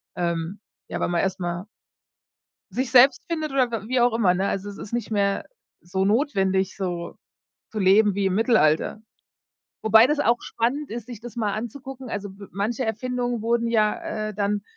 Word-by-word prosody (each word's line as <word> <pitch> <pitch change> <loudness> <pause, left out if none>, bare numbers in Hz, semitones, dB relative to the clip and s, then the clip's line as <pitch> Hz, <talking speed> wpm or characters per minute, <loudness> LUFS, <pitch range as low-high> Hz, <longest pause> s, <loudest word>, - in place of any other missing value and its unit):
ähm, 170 +2 -2 0.3
ja, - - -4
weil - - 0
man 170 -1 +1
erst 190 -1 -1
mal 175 +2 -3 1.0
sich 255 -1 -2
selbst 255 0 +6
findet 310 -3 -2
oder 255 -3 +2
w 220 -1 -4
wie 255 -1 +2
auch 240 -1 +4
immer, 205 -6 +3
ne? 190 +2 0
Also, 200 +1 -3
es 200 - -9
ist 210 - -9
nicht 240 -2 -2
mehr 200 -2 +1 0.4
so 190 +2 -1
notwendig 195 -6 +1
so 175 -3 -4 0.5
zu 215 - -4
leben 205 +2 +5
wie 200 -1 +1
im 185 - 0
Mittelalter. 215 -4 +2 0.8
Wobei 220 +2 +7
das 295 +1 0
auch 235 +1 +2
spannend 270 +5 -2
ist, 235 0 -6
sich 240 -4 -9
das 240 -2 -9
mal 210 -3 0
anzugucken. 260 +3 -7
Also, 205 -1 -4
w 200 - -9
manche 220 +6 -1
Erfindungen 245 +1 -2
wurden 235 0 +1
ja, 215 -1 0
äh, 215 - -6
dann 205 0 0
215 Hz, 185 wpm, -24 LUFS, 195-240 Hz, 1.0 s, Wobei